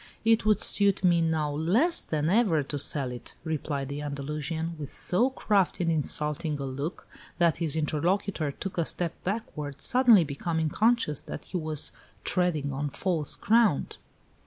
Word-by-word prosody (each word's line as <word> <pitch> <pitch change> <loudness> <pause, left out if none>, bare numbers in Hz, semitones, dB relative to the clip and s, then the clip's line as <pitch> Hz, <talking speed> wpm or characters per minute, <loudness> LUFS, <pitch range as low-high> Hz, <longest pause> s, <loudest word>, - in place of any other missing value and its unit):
"It 225 -1 +3
would 215 - +4
suit 200 -2 +3
me 175 -2 +4
now 160 -2 0
less 215 - +2
than 155 -1 -2
ever 185 -6 +3
to 145 +1 -3
sell 140 -2 -1
it," 125 - -9
replied 145 -3 -3
the 145 +1 -4
Andalusian, 150 +3 -4
with 145 -3 -6
so 235 +9 +2
crafty 200 -8 +1
and 165 -1 +1
insulting 150 0 +1
a 140 - -5
look 140 +5 -5 0.3
that 170 -3 +3
his 160 -3 0
interlocutor 160 +1 -1
took 185 +5 -5
a 165 - +1
step 170 0 -2
backward, 150 -9 -4
suddenly 240 - +5
becoming 160 +2 -2
conscious 220 - +1
that - - -8
he 185 - -4
was 155 -3 0 0.3
treading 155 -6 0
on 145 +2 -2
false 160 -1 -1
ground. 220 -8 +2
160 Hz, 160 wpm, -27 LUFS, 145-190 Hz, 0.3 s, suddenly